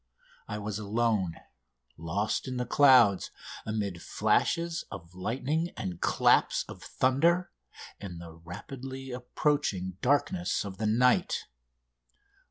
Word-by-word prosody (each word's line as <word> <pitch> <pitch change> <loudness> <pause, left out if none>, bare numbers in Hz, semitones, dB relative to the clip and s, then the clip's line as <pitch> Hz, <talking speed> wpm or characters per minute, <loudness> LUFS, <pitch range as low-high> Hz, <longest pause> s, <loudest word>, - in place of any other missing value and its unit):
I 105 - -4
was 105 0 -4
alone, 105 -4 0 0.6
lost 85 +10 -2
in 130 -1 -3
the 125 - -1
clouds, 125 -10 +5 0.4
amid 100 -5 -2
flashes 170 0 +1
of 90 -4 -9
lightning 135 - -1
and 90 -2 -5
claps - - +3
of - - -10
thunder, 165 +8 +2 0.5
in 90 -4 -7
the 85 -1 -9
rapidly 130 +11 -8
approaching 125 - -1
darkness 145 - +1
of 95 0 -7
the 110 - 0
night! 125 +4 +2
110 Hz, 110 wpm, -29 LUFS, 95-135 Hz, 0.6 s, clouds